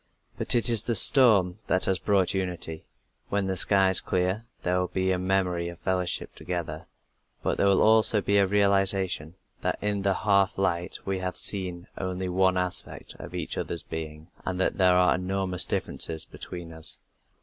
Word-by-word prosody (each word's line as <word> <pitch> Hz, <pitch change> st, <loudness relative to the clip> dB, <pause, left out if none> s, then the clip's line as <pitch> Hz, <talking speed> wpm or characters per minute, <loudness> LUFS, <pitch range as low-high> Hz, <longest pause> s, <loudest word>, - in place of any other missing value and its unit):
But -, -, +2 dB
it 120 Hz, -, +2 dB
is 115 Hz, -3 st, +4 dB
the 115 Hz, -, 0 dB
storm 105 Hz, -6 st, +5 dB
that 95 Hz, -, +1 dB
has 95 Hz, -1 st, +1 dB
brought 100 Hz, -3 st, +1 dB
unity. 90 Hz, -4 st, -4 dB, 0.4 s
When 100 Hz, -1 st, -1 dB
the 95 Hz, 0 st, -2 dB
skies 95 Hz, -1 st, +4 dB
clear, 95 Hz, +5 st, -2 dB, 0.2 s
there 90 Hz, +1 st, 0 dB
will 90 Hz, -, -1 dB
be 95 Hz, +1 st, -1 dB
a 90 Hz, -, 0 dB
memory 90 Hz, -2 st, -1 dB
of 85 Hz, -, -10 dB
fellowship 90 Hz, -1 st, -1 dB
together, 85 Hz, -4 st, -6 dB, 0.6 s
but -, -, -1 dB
there 100 Hz, -, +3 dB
will 100 Hz, -1 st, +3 dB
also 110 Hz, 0 st, +5 dB
be 100 Hz, 0 st, +1 dB
a 100 Hz, -1 st, +4 dB
realization 95 Hz, -4 st, 0 dB, 0.3 s
that -, -, -1 dB
in 105 Hz, -1 st, -2 dB
the 95 Hz, -1 st, 0 dB
half 100 Hz, -2 st, +1 dB
light 90 Hz, -3 st, -2 dB
we 95 Hz, -1 st, -2 dB
have 90 Hz, 0 st, -4 dB
seen 90 Hz, -3 st, -2 dB
only 95 Hz, 0 st, -4 dB
one 95 Hz, 0 st, +2 dB
aspect 90 Hz, -2 st, -3 dB
of -, -, -9 dB
each -, -, -4 dB
other's 85 Hz, -, -4 dB
being, 80 Hz, 0 st, -8 dB
and 90 Hz, -1 st, -4 dB
that 95 Hz, -, -1 dB
there 90 Hz, -1 st, +4 dB
are 90 Hz, 0 st, +4 dB
enormous 90 Hz, 0 st, 0 dB
differences 80 Hz, -1 st, -1 dB
between 85 Hz, -2 st, -9 dB
us. 80 Hz, 0 st, -2 dB
95 Hz, 175 wpm, -26 LUFS, 90-100 Hz, 0.6 s, storm